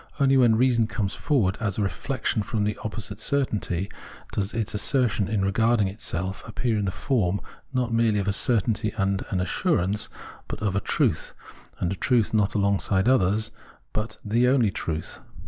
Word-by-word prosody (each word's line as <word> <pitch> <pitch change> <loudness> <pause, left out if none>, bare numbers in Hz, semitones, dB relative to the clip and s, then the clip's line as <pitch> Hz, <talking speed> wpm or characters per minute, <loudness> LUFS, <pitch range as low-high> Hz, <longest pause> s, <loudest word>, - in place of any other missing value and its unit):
Only 135 -1 +4
when 120 -4 +5
reason 120 -2 +3
comes 110 -3 -2
forward 120 -11 +1
as 105 -4 -1
a 105 - +1
reflexion 110 +4 -1
from 105 +1 -1
this 105 0 0
opposite 110 -2 -5
certainty, 105 - 0 0.4
does 100 0 -1
its 115 -1 -2
assertion 105 -2 +2 0.2
regarding 110 +1 +2
itself 95 -1 -3
appear 115 +1 -1
in 100 - -1
the 95 - 0
form 100 -5 0 0.3
not 125 -3 -1
merely 115 -2 +3
of 100 -1 -1
a 100 - +2
certainty 110 0 +1
and 95 -1 0
an 95 - -1
assurance, 95 +3 0 0.4
but - - -5
of 100 -3 -1
a - - +3
truth - - 0 0.2
— - - -25
and 90 +2 0
a - - -5
truth 115 +5 +1
not 105 -2 +2
alongside 100 0 +2
others, 105 -3 +3 0.4
but 110 +1 -3
the 115 +4 +3
only 125 -5 +3
truth. 80 -3 -4
105 Hz, 170 wpm, -25 LUFS, 100-115 Hz, 0.4 s, when